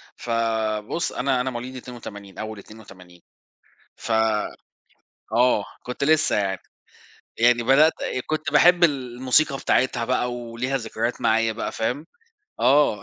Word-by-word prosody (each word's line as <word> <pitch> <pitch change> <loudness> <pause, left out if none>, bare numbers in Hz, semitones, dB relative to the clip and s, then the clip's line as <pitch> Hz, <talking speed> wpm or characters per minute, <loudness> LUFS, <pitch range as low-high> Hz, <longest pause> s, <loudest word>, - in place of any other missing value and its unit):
فبُص 115 +3 -1
أنا 130 -1 0
أنا 130 - -2
مواليد 125 +2 -6
82، 110 -6 -10
أول 110 -1 -6
82، 95 -5 -15 0.8
ف 115 - -4 1.2
آه، 120 -3 +3 0.2
كنت 125 +2 -4
لسه 155 +1 +3
يعني، 95 -2 -1 0.8
يعني 120 0 +4
بدأت 145 +6 +5
آآ، 130 - -2
كنت 155 0 -2
باحب 175 0 +5
الموسيقى 130 0 +2
بتاعتها 125 -3 +1
بقى 125 -1 0
وليها 120 +3 -3
ذكريات 115 0 -3
معايا 110 0 +2
بقى، 115 - -4
فاهم، 125 +7 -3 0.6
آه، 130 -6 +3
120 Hz, 120 wpm, -23 LUFS, 110-130 Hz, 1.2 s, بدأت